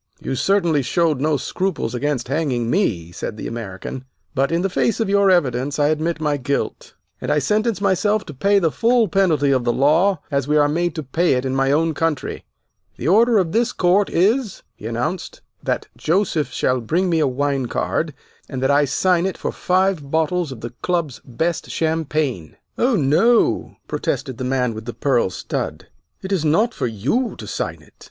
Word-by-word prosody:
"You - - -4
certainly 170 0 +2
showed 150 +2 +1
no 150 0 +2
scruples 185 -6 -2
against 130 -1 -1
hanging 130 -5 -1
me," 90 - 0
said 105 +5 -6
the - - -6
American, 115 +3 -6 0.3
"but 135 +1 +1
in 170 +2 +1
the - - +2
face 225 +5 0
of 220 -3 0
your 200 0 +4
evidence 140 -6 +1
I 145 0 +3
admit 155 +2 -1
my 150 -2 0
guilt, 140 +1 -3 0.3
and - - -2
I - - +3
sentence 210 - +1
myself 205 +2 +1
to 150 - -8
pay 200 +9 +2
the 165 -5 +2
full 235 +3 +3
penalty 165 -7 +2
of 130 -2 +2
the 120 - +2
law 155 +9 +3
as 140 -1 0
we 150 +1 +3
are 145 -1 +4
made 170 +3 -1
to 155 - -4
pay 165 +6 +1
it 125 0 -1
in 130 0 -1
my 135 0 +2
own 160 +2 +2
country. 160 -1 -2 0.5
The 130 - -4
order 225 +5 +5
of 180 -5 +1
this 235 +4 +1
court 190 +3 +2
is," 215 +5 +1
he 110 - -8
announced, 120 +10 -4 0.2
"that - - -2
Joseph 165 -3 0
shall 130 -1 0
bring 170 +11 0
me 165 -2 +2
a 150 - +3
wine 135 0 -1
card, 115 - -2 0.3
and 130 - -4
that 135 - +3
I 145 +1 +4
sign 180 +5 +2
it 190 - -4
for - - -3
five 185 -5 0
bottles 160 +1 0
of 120 -4 -8
the 120 +1 -6
Club's 170 -7 -1
best 160 +8 -2
champagne." 155 - -2 0.2
"Oh, 245 0 +2
no!" 185 - +2
protested 130 -5 -3
the 130 - -2
man 125 -2 0
with 110 0 -8
the 120 - -6
pearl 125 -8 +1
stud, - - -5 0.3
"it 190 - -5
is 185 -5 +1
not 210 +10 +2
for 125 - -2
you 130 - -1
to - - -8
sign - - -4
it. - - -22
155 Hz, 195 wpm, -21 LUFS, 130-185 Hz, 0.5 s, order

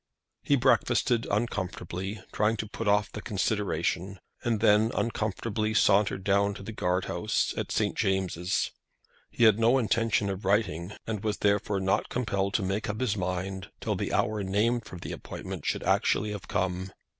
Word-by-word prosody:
He - - +3
breakfasted 115 -2 +2
uncomfortably, 95 -2 -3
trying 110 +2 +1
to 110 - -3
put 110 +1 -5
off 105 +1 +3
the 105 - -6
consideration, 95 -2 -1 0.2
and 115 -3 +1
then 110 0 +5
uncomfortably 110 -1 -1
sauntered 100 -2 +3
down 100 +1 +2
to 100 - -9
the 110 - -6
Guard 90 -3 0
House, - - 0
at - - -3
St. - - 0
James's. 95 -1 0 0.6
He - - 0
had 110 -1 +6
no 115 +3 +5
intention 115 -3 +1
of 95 +1 -6
writing, 95 -2 0
and 110 -2 -3
was 105 -1 -1
therefore 100 -1 +1
not 95 0 +1
compelled 100 -5 -1
to 105 - +2
make 100 +3 -2
up 105 +1 -3
his 125 -5 +1
mind 95 0 -3
till - - -1
the - - -2
hour 105 -1 +1
named 105 +5 +1
for 90 - -9
the - - -7
appointment - - -6
should - - -1
actually 105 0 +2
have 105 -3 -6
come. 95 +1 -1
100 Hz, 170 wpm, -28 LUFS, 95-110 Hz, 0.6 s, had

